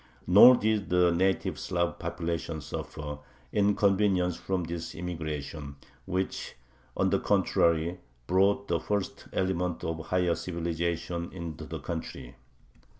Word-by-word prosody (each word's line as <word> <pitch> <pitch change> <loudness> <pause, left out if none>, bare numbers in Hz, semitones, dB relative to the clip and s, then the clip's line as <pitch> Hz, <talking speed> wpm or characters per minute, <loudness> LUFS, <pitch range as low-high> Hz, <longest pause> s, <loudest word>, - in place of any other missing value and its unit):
Nor 105 +8 +9
did 110 -3 0
the 90 -1 +4
native 95 +3 +1
Slav 85 -1 -1
population 85 -2 -3
suffer 75 0 -6 0.3
inconvenience 100 -3 +3
from 95 0 -2
this 85 0 -5
immigration, 80 -4 -5 0.3
which, 95 0 -2 0.4
on - - +2
the - - +3
contrary, 85 +2 +2 0.3
brought 100 +4 +2
the 85 -1 +1
first 100 +3 -3
elements 90 -2 -1
of 80 0 -2
a - - -6
higher 90 -2 +2
civilization 85 0 -3
into 85 -5 -6
the - - -5
country. 80 -7 -6
85 Hz, 120 wpm, -29 LUFS, 80-95 Hz, 0.4 s, Nor